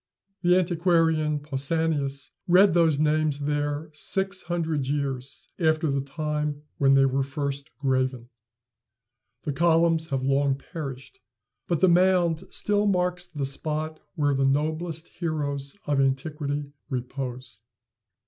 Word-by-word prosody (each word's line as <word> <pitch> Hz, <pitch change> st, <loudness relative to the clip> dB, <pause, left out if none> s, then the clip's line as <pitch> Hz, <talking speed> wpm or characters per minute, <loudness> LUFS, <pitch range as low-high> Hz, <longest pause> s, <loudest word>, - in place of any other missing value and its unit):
The 180 Hz, 0 st, +4 dB
antiquarian 165 Hz, -3 st, +2 dB
Pausanias 145 Hz, -1 st, -2 dB, 0.2 s
read 185 Hz, +1 st, +6 dB
those 165 Hz, -4 st, +4 dB
names 155 Hz, -1 st, +2 dB
there 145 Hz, +1 st, -2 dB
six 190 Hz, +5 st, -1 dB
hundred 160 Hz, -5 st, -2 dB
years 140 Hz, -2 st, -3 dB
after 155 Hz, -2 st, +2 dB
the 140 Hz, 0 st, 0 dB
time 150 Hz, +1 st, -3 dB, 0.2 s
when 135 Hz, -1 st, +5 dB
they 135 Hz, 0 st, +5 dB
were 135 Hz, +1 st, +1 dB
first 140 Hz, +1 st, -3 dB
graven. 130 Hz, -3 st, 0 dB, 1.2 s
The 145 Hz, -, -2 dB
columns 165 Hz, +1 st, +3 dB
have 135 Hz, -3 st, -2 dB
long 135 Hz, 0 st, +2 dB
perished, 135 Hz, -2 st, -8 dB, 0.5 s
but 170 Hz, -3 st, 0 dB
the 190 Hz, -, +6 dB
mound 175 Hz, -2 st, +3 dB
still 205 Hz, 0 st, +1 dB
marks 180 Hz, -2 st, 0 dB
the 150 Hz, -5 st, -3 dB
spot 155 Hz, +3 st, -3 dB, 0.2 s
where 145 Hz, -3 st, +2 dB
the 135 Hz, 0 st, +1 dB
noblest 155 Hz, +4 st, -1 dB
heroes 145 Hz, -3 st, -3 dB
of 145 Hz, -2 st, +2 dB
antiquity 145 Hz, +1 st, -2 dB, 0.2 s
repose. 125 Hz, -3 st, -5 dB
150 Hz, 120 wpm, -26 LUFS, 140-165 Hz, 1.2 s, read